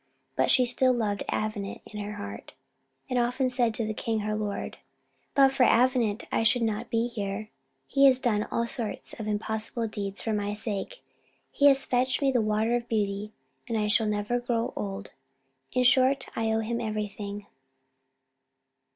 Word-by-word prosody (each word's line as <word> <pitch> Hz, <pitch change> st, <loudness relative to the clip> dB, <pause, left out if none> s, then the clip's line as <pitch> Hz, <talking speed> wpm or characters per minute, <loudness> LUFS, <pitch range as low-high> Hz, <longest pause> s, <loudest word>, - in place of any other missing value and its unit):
But -, -, +2 dB
she 255 Hz, -, +5 dB
still 255 Hz, +1 st, +3 dB
loved 210 Hz, -4 st, -1 dB
Avenant 215 Hz, -2 st, -3 dB
in 210 Hz, -, -8 dB
her 205 Hz, 0 st, -4 dB
heart, 205 Hz, -1 st, -8 dB, 0.5 s
and 255 Hz, -2 st, 0 dB
often 250 Hz, +2 st, +1 dB
said 240 Hz, -3 st, +1 dB
to 225 Hz, -, -1 dB
the 215 Hz, -, -2 dB
king 220 Hz, 0 st, -2 dB
her 215 Hz, +1 st, -1 dB
lord 210 Hz, -1 st, -4 dB, 0.6 s
"But 270 Hz, -1 st, +6 dB
for 270 Hz, 0 st, -2 dB
Avenant 245 Hz, -3 st, +3 dB
I -, -, +1 dB
should 230 Hz, +2 st, +3 dB
not 225 Hz, +1 st, -2 dB
be 230 Hz, 0 st, +1 dB
here; 210 Hz, -2 st, -4 dB, 0.3 s
he 275 Hz, 0 st, +4 dB
has 260 Hz, -1 st, +4 dB
done 215 Hz, -5 st, 0 dB
all 235 Hz, -, 0 dB
sorts 235 Hz, -2 st, -3 dB
of 215 Hz, -, -4 dB
impossible 220 Hz, +2 st, -2 dB
deeds 200 Hz, -2 st, -4 dB
for 225 Hz, -, -1 dB
my 205 Hz, 0 st, -1 dB
sake; 215 Hz, -, -4 dB, 0.5 s
he 285 Hz, -, +4 dB
has 275 Hz, -1 st, +5 dB
fetched 255 Hz, +1 st, +1 dB
me 275 Hz, -1 st, +2 dB
the 245 Hz, -3 st, +2 dB
water 215 Hz, +2 st, +1 dB
of 240 Hz, 0 st, -3 dB
beauty, 210 Hz, -1 st, -1 dB, 0.4 s
and 230 Hz, -, 0 dB
I 210 Hz, -1 st, +1 dB
shall 215 Hz, +1 st, +2 dB
never 210 Hz, +3 st, 0 dB
grow 235 Hz, -1 st, -1 dB
old 195 Hz, 0 st, -5 dB, 0.6 s
in 255 Hz, -, +2 dB
short, 260 Hz, +2 st, +4 dB
I 225 Hz, -, 0 dB
owe 220 Hz, 0 st, +1 dB
him 235 Hz, +2 st, -2 dB
everything." 210 Hz, -2 st, -4 dB
225 Hz, 175 wpm, -28 LUFS, 210-245 Hz, 0.6 s, But